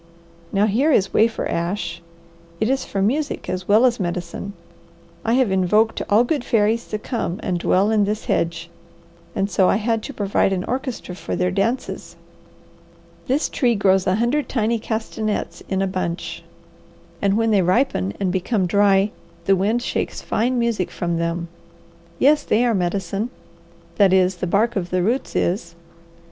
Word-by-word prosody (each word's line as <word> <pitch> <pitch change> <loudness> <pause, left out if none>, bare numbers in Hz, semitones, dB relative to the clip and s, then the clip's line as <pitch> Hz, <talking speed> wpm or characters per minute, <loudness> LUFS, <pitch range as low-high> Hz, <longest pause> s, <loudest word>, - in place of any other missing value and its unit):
Now 200 +1 +3
here 245 +9 +2
is 195 -8 +2
wafer 225 +1 +2
ash; 170 0 -3 0.6
it 220 +4 +1
is 270 - 0
for 195 -1 -2
music 285 +8 -1
as 185 0 -4
well 215 +5 +5
as 245 -2 +2
medicine. 175 +2 -4 0.7
I 230 - +1
have 250 -5 +3
invoked 200 +4 +2
all 215 +3 +5
good 275 +1 -1
fairies 225 0 +1
to 215 - -3
come 210 -5 -3
and 175 -1 -1
dwell 195 +5 +2
in 210 -2 +3
this 210 +2 -3
hedge, 170 0 -1 0.6
and 195 -2 +1
so 190 -2 +3
I - - +3
had 225 +1 0
to - - -6
provide 200 -1 +1
an 180 -1 -1
orchestra 255 -6 -4
for 180 - -5
their 180 0 0
dances. 210 +7 -2 1.1
This 275 +4 +1
tree 240 -4 +1
grows 190 -2 +2
a 185 - +3
hundred 240 +5 0
tiny 230 -1 0
castanets 220 -1 -3
in 190 0 0
a - - 0
bunch, 185 -2 -4 0.8
and 200 +1 +2
when 225 0 +2
they 200 -2 +4
ripen 180 - +1
and 190 -2 0
become 190 +2 0
dry 200 +2 +3 0.3
the 195 - +4
wind 215 +6 0
shakes - - -2
fine 245 +3 0
music 230 -6 0
from 170 -1 -2
them. 170 +1 -2 0.7
Yes, 295 +2 +4
they 240 -3 +2
are 235 - +2
medicine; 195 +3 -1 0.7
that 195 -3 +5
is, 185 -1 +3
the 180 - -3
bark 220 +6 +1
of 180 -3 -2
the 180 0 0
roots 240 +7 -1
is. 170 -2 -1
205 Hz, 165 wpm, -21 LUFS, 185-230 Hz, 1.1 s, well